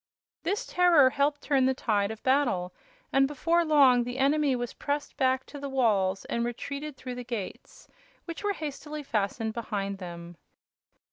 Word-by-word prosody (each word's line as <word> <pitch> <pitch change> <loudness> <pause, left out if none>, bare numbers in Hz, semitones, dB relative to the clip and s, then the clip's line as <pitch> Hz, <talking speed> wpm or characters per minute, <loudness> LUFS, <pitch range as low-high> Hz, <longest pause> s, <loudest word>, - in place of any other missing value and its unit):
This 395 +5 -1
terror 335 -7 +5
helped 290 +1 0
turn 270 -3 +3
the 265 - +1
tide 205 -5 0
of 220 0 -8
battle, 255 -10 +1 0.4
and 270 0 +5
before 330 +4 +1
long 275 -6 +5
the 245 +1 -5
enemy 280 0 +2
was 245 -1 -4
pressed 290 0 -3
back 260 -1 +1
to 290 - -10
the 280 0 -5
walls 205 -8 +1
and 235 - -1
retreated 280 +4 -5
through 255 -1 -6
the 245 0 -6
gates, 230 -6 -7 0.4
which 335 +2 -7
were 410 0 +1
hastily 300 -2 -6
fastened 220 -2 -1
behind 200 -4 -3
them. 170 -2 -8
260 Hz, 160 wpm, -28 LUFS, 220-290 Hz, 0.4 s, terror